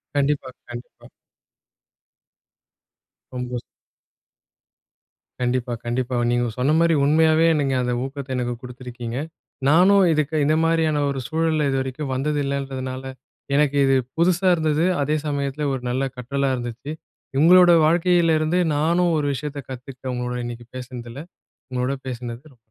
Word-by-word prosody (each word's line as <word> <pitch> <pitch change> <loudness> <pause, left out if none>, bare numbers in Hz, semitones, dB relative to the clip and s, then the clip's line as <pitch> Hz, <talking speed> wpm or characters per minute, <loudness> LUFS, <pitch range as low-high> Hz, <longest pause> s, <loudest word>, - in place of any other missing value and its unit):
கண்டிப்பா, 140 -2 0 0.2
கண்டிப்பா. 120 +1 -10 2.3
சந்தோஷம். 125 -1 -4 1.8
கண்டிப்பா, 125 0 -1
கண்டிப்பா. 125 +1 -2 0.2
நீங்க 120 0 +1
சொன்ன 135 +5 +2
மாரி 170 0 +4
உண்மையாவே 160 +2 +4
நீங்க 135 -2 0
அந்த 125 0 -1
ஊக்கத்தை 135 0 -6
எனக்குக் 120 -1 -3
கொடுத்திருக்கீங்க. 125 -1 -7 0.5
நானும் 190 +4 +6
இதுக்கு 155 0 -1
இந்த 155 +1 +3
மாதிரியான 160 -2 +2
ஒரு 135 -1 -2
சூழல்ல 160 -2 +1
இதுவரைக்கும் 135 +1 -3
வந்தது 145 +3 -1
இல்லைன்றதுனால 135 -2 -4 0.5
எனக்கு 145 -1 +2
இது 135 0 +3 0.2
புதுசா 175 +2 +2
இருந்தது. 155 +1 +1 0.2
அதே 150 +2 +1
சமயத்துல 145 0 -2
ஒரு 130 - -3
நல்ல 130 +2 0
கற்றலா 135 +2 -1
இருந்துச்சு. 120 +3 -6 0.5
உங்களோட 180 +2 +7
வாழ்க்கையில 170 0 +3
இருந்து 155 +4 +1 0.2
நானும் 170 +3 +2
ஒரு 150 - 0
விஷயத்தைக் 140 0 -6
கத்துக்கிட்டேன். 130 0 -7
உங்களோட 125 0 -3
இன்னைக்கு 120 0 -7
பேசுனதுல. 125 +2 -8 0.5
உங்களோட 125 +2 -1
பேசினதுல 125 +2 -7
140 Hz, 120 wpm, -22 LUFS, 125-155 Hz, 2.3 s, உங்களோட